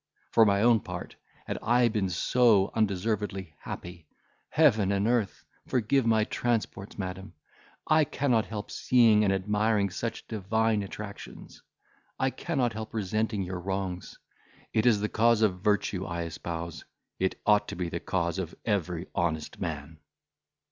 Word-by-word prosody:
for 115 - +6
my 100 +1 +3
own 120 -1 +5
part, - - -7 0.3
had - - -4
I 120 +2 +4
been 105 -4 0
so 105 +2 +3
undeservedly 100 -4 -1
happy—Heaven 100 - -1
and 100 +1 +1
earth! 115 -4 0 0.2
forgive 125 +1 +1
my 110 -1 +4
transports, 110 -3 -2
madam, 95 -2 -6 0.5
I 155 -1 +4
cannot 125 -6 +1
help 105 -2 -6
seeing 115 -4 +4
and 100 - +3
admiring 105 +1 +1
such 115 +4 -4
divine 110 +1 0
attractions. 100 +1 -9 0.6
I 130 0 +1
cannot 130 -9 -1
help 110 +1 -7
resenting 110 0 -1
your 90 0 -4
wrongs; 95 -1 -4 0.6
it 110 +2 +2
is 110 -4 +4
the 105 - +1
cause 115 +1 +3
of 90 -4 +1
virtue 100 -2 +1
I 85 -2 -3
espouse; 85 0 -6 0.4
it 95 0 0
ought 105 -1 +4
to - - -5
be 90 -1 -2
the 85 - -3
cause 85 +1 -1
of 85 -3 -5
every 90 -5 -1
honest 80 -3 -2
man." 80 -1 -5
105 Hz, 140 wpm, -28 LUFS, 95-115 Hz, 0.6 s, for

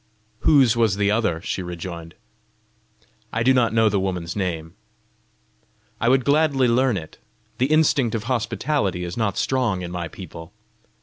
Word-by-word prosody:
"Whose 130 -2 +4
was 115 -4 +2
the 100 0 +2
other?" 105 -7 0
she 95 - -3
rejoined. 85 -1 -7 1.2
"I 115 - -1
do 130 +2 +5
not 125 -3 +2
know 110 0 +3
the 100 -2 +1
woman's 90 -3 -3
name." 85 -5 -3 1.3
"I 115 - +2
would 130 -1 +3
gladly 145 -3 +3
learn 120 -1 +2
it! 80 -3 -9 0.4
The 130 - +3
instinct 145 -6 +2
of 110 - -3
hospitality 115 - -1
is 85 0 -5
not 100 -4 -1
strong 120 -9 0
in 85 - -6
my 90 -1 -4
people!" 85 -1 -10
105 Hz, 150 wpm, -22 LUFS, 90-125 Hz, 1.3 s, do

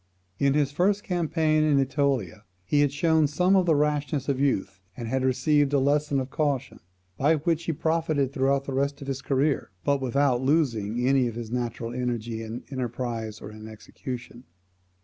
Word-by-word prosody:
In 140 0 +3
his 145 -2 +2
first 195 +7 +1
campaign 160 -3 +1
in 150 -2 +3
AEtolia 135 - 0 0.2
he 145 +10 +2
had 145 -2 +3
shown 160 +1 +3
some 180 +7 +2
of 185 -2 +3
the 160 - +4
rashness 145 -1 0
of 140 -2 0
youth, 100 -8 0 0.2
and 115 - -5
had 130 +2 -1
received 145 +3 +2
a 140 - +4
lesson 145 +1 +1
of 130 0 -4
caution, 140 -4 -1 0.4
by 150 +4 +3
which 165 +2 -1
he 165 - 0
profited 155 -3 0
throughout 135 0 +1
the 135 - -5
rest 140 +1 -1
of - - -10
his 135 -1 -3
career, 140 +1 0
but 140 -1 +1
without 130 -1 +1
losing 125 -5 +1
any 135 -2 +3
of 115 - -5
his 115 -1 -6
natural 120 -1 -3
energy 120 -2 -3
in 115 +2 -6
enterprise 120 -4 -4
or 105 - -8
in 110 0 -10
execution. 120 +3 -8
135 Hz, 180 wpm, -26 LUFS, 125-150 Hz, 0.4 s, the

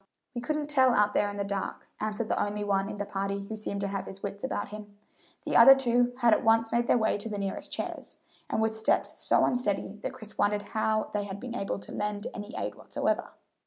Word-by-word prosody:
"We 240 - -4
couldn't 300 +3 -1
tell 260 -4 +4
out 210 0 +3
there 205 - +2
in 205 - -6
the 200 - 0
dark," 200 -1 -4
answered 215 +1 -2
the - - +1
only 205 0 -2
one 195 -1 +1
in - - -6
the 205 - -2
party 200 0 -2
who 220 +2 -6
seemed 200 -2 -3
to 200 - 0
have 195 -1 -4
his 195 0 -9
wits 200 0 -5
about 235 -6 -2
him. 205 -1 -10 0.5
The - - -1
other 270 - +10
two 245 -2 +2
had 235 -2 +6
at - - +2
once 225 0 +4
made 235 0 +1
their - - +5
way 220 -2 +1
to 225 - -4
the 210 - -3
nearest 195 -1 -4
chairs, - - -5 0.3
and 220 - +1
with 220 0 0
steps 220 - 0
so - - +3
unsteady 210 -4 -1
that - - -4
Chris 215 -4 -9
wondered 205 0 +2
how 220 -1 +1
they 205 -1 -1
had 200 0 -6
been 250 +1 -6
able 200 -5 -2
to 195 - -10
lend 210 0 -3
any 205 0 -7
aid 105 0 -2
whatsoever. - - -2
210 Hz, 235 wpm, -29 LUFS, 200-230 Hz, 0.5 s, other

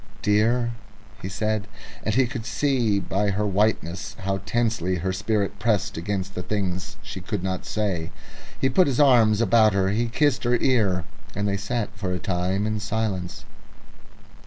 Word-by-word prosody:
"Dear," 115 +3 +2 0.5
he 95 - -4
said, 110 +1 -1 0.4
and 110 - 0
he 130 0 +4
could 120 -1 -5
see 120 -8 +1
by 100 +1 0
her 100 +2 0
whiteness 100 -1 0
how 95 0 -1
intensely 110 -5 0
her 95 +2 -1
spirit 100 0 -1
pressed 110 -2 0
against 95 +2 -3
the 90 - -4
things 95 0 -3
she 100 -2 -7
could 100 0 -3
not 95 -1 -3
say. 95 -7 -1 0.5
He 135 - +2
put 180 +7 +4
his 135 -2 0
arms 120 -6 +5
about 110 -1 +5
her, 95 -1 +2
he 115 +4 +1
kissed 140 +3 +1
her 120 0 +3
ear, 105 -9 +2 0.3
and 100 +1 0
they 100 - +1
sat 105 +2 -2
for 95 -3 -3
a - - -1
time 95 +2 -1
in 110 0 -1
silence. 105 -4 -3
105 Hz, 165 wpm, -24 LUFS, 95-115 Hz, 0.5 s, arms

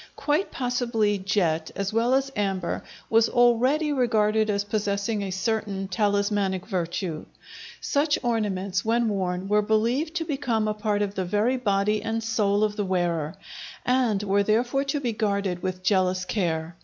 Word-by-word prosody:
Quite 305 +6 0
possibly 235 -5 0
jet, 175 -5 0
as 200 +1 -2
well 235 +3 +3
as 270 0 0
amber, 195 -4 -2 0.2
was 225 0 +4
already 255 +6 +3
regarded 220 -4 +2
as 200 -1 +1
possessing 205 0 -1
a 195 - -3
certain 195 0 -2
talismanic 200 -1 0
virtue. 175 -4 -3 0.6
Such 290 +1 +1
ornaments, 200 -5 -1
when 230 +1 +1
worn, 185 -2 -2
were 210 +1 +3
believed 235 +10 0
to 330 -2 -1
become 255 -8 -1
a 215 - 0
part 210 -1 0
of 200 -1 -3
the 190 -2 -2
very 210 +8 +1
body 210 -2 +1
and 225 +1 -2
soul 210 -2 +1
of 210 0 0
the 205 - 0
wearer, 170 -4 -1 0.5
and 245 -5 +2
were 200 0 +2
therefore 240 +6 +1
to 280 +1 -1
be 250 -4 -1
guarded 200 -4 -1
with 185 -1 -4
jealous 185 -1 +2
care. 165 -4 -2
210 Hz, 155 wpm, -25 LUFS, 190-235 Hz, 0.6 s, was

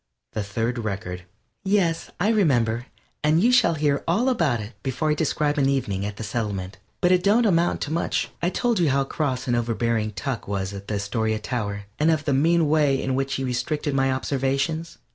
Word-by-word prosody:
THE 110 - -1
THIRD 115 +4 -2
RECORD 95 -5 -4 0.4
Yes, 190 -5 +1
I 200 +5 +2
remember, 125 - +2 0.4
and 155 +2 +4
you 235 +7 +4
shall 245 -9 +4
hear 145 -2 +1
all 215 +10 +2
about 160 - +1
it 105 +3 -7
before 140 +4 -1
I - - +4
describe 150 -1 0
an 135 -1 +3
evening 100 -8 -1
at 105 0 -7
the - - -5
Settlement, 100 -4 -3 0.2
but 180 - +4
it 180 -1 +4
don't 215 +5 +4
amount 175 -4 +2
to 150 - -3
much. 170 +2 -1
I 175 - +2
told 235 +1 0
you 165 -4 +3
how 135 +1 +2
cross 135 -2 -2
and 120 - +1
over 120 -1 0
bearing 115 -2 0
Tuck 130 +1 -4
was 100 -1 -2
at 100 0 -8
the 105 - -2
Astoria 110 +2 -1
tower, 105 -3 -3 0.2
and 155 +2 +3
of 155 -2 +1
the 145 - +1
mean 165 +4 +3
way 145 -3 +3
in 130 - -1
which 135 +1 -1
he 135 - -2
restricted 145 +4 -1
my 135 0 +2
observations. 140 +5 -1
135 Hz, 205 wpm, -24 LUFS, 115-160 Hz, 0.4 s, and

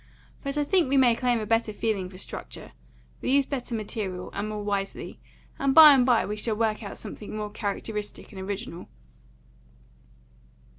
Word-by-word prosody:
But 275 0 -3
I 295 - +2
think 345 -1 +2
we 275 - +3
may 245 -3 +5
claim 245 -1 +1
a 215 - -3
better 225 0 +1
feeling 205 -3 -2
for 185 - -12
structure. - - -8 0.5
We - - -2
use 280 -1 +4
better 250 -4 -4
material, 205 -4 -4
and 205 +2 -3
more 210 -1 -4
wisely; 200 -1 -3 0.4
and 275 -1 +1
by 310 -2 +11
and 255 -2 +4
by 240 -3 +4
we 210 +2 -4
shall 215 +1 0
work 220 0 0
out 200 -2 -7
something 210 - -7
more 210 -1 -4
characteristic 210 0 -5
and 190 -2 -8
original." 190 -3 -6
215 Hz, 170 wpm, -26 LUFS, 205-250 Hz, 0.5 s, by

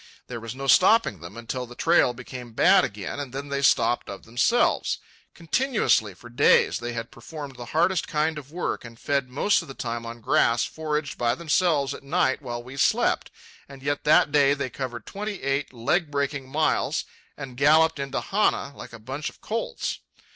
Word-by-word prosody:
There 120 -2 -6
was 115 +1 -7
no 135 +1 -6
stopping 185 - +4
them 85 +6 -10
until 125 +2 -5
the 120 - -12
trail 165 -4 +3
became 125 -1 -9
bad - - +5
again, 100 +6 -4
and 140 -3 -5
then 140 +2 -6
they 140 0 -1
stopped 120 -3 +2
of 100 -1 -8
themselves. 120 - +1 0.4
Continuously, 170 - +1
for 120 - -13
days, 120 +4 +3
they 120 0 -4
had 115 0 -5
performed 140 +2 -9
the 120 -1 -8
hardest 170 +6 +1
kind 155 0 0
of 140 0 -14
work, 175 +2 -3
and 115 -1 -11
fed 140 -3 -1
most 165 +12 +2
of 165 - -11
the 135 - -9
time 120 -1 -4
on 115 +1 -8
grass 115 +1 +2
foraged 150 -2 -3
by 120 0 +1
themselves 155 -3 +1
at - - -9
night 140 -1 0
while 120 -3 -5
we 130 +2 -10
slept, - - +2 0.4
and 135 -1 -12
yet 145 0 -1
that 150 -1 +4
day 140 -1 +4
they 140 -3 -4
covered 120 -3 -5
twenty 205 -3 -6
eight 135 +1 -1
leg 140 +8 0
breaking 140 -2 -2
miles 155 +3 0 0.3
and 130 -2 -8
galloped 155 +3 +4
into 140 0 -3
Hana 190 -8 0
like - - -10
a - - -8
bunch 135 +7 -5
of - - -19
colts. 225 +1 -3
140 Hz, 190 wpm, -25 LUFS, 120-155 Hz, 0.4 s, bad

